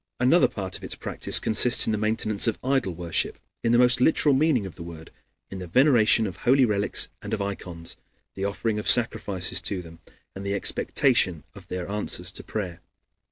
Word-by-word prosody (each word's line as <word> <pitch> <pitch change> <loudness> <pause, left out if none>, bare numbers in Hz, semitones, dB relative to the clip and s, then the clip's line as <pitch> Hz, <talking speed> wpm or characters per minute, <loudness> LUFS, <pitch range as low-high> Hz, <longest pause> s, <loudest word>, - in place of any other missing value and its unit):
Another 130 +8 +4
part 95 -3 -5
of - - -19
its - - -6
practice - - -1
consists 120 +3 +4
in - - -1
the 110 - -1
maintenance 110 0 +2
of 115 - 0
idol 130 -9 0
worship 85 0 -2 0.3
in 115 - +1
the 120 - +4
most 125 0 +3
literal 150 +1 +3
meaning 135 -6 +2
of 95 - -8
the - - -12
word; 85 -1 -10 0.4
in 95 - -7
the 90 - -7
veneration 120 - +4
of 95 -4 -6
holy 130 +1 +3
relics, 100 -3 -1
and - - -3
of - - -9
ikons, 90 -4 -7 0.4
the 95 - -6
offering 105 +2 -2
of 105 - -1
sacrifices 100 -6 +2
to 95 -3 -4
them, 80 -1 -14 0.4
and 95 - -7
the 100 0 -2
expectation 100 - 0
of 95 -3 -14
their 90 0 -5
answers 95 -3 -3
to - - -10
prayer. 90 -6 -5
105 Hz, 195 wpm, -25 LUFS, 90-120 Hz, 0.4 s, Another